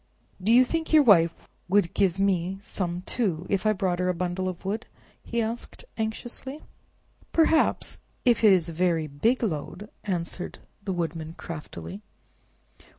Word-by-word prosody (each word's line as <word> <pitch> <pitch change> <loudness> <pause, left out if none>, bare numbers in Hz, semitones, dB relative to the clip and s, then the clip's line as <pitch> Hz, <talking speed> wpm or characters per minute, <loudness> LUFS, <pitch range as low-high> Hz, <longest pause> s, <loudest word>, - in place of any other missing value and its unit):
"Do 205 +5 +2
you 245 +2 +8
think 325 +4 -2
your 310 -2 +7
Wife 170 - +6 0.4
would 195 -3 +3
give 190 -2 +2
mite 195 0 0
some, 180 -3 -3
too, 185 -7 -1
if 200 +1 +1
I 215 - +4
brought 185 -3 0
her 180 0 +1
a 180 - 0
bundle 180 +2 -1
of 185 +1 -8
wood?" 210 +4 -2 0.4
he 235 - -2
asked 230 - -5
anxiously. 240 +6 -5 0.7
"Perhaps; 325 -1 +3 0.3
if 235 -3 +4
it 215 - +8
is 180 -3 +4
a 165 - -5
very 170 -1 +1
big 185 - +1
load," 195 +2 -3
answered 180 -2 -3 0.3
the 195 - -2
Woodman 165 -2 -3
craftily. 100 - -7
190 Hz, 150 wpm, -27 LUFS, 170-220 Hz, 0.7 s, you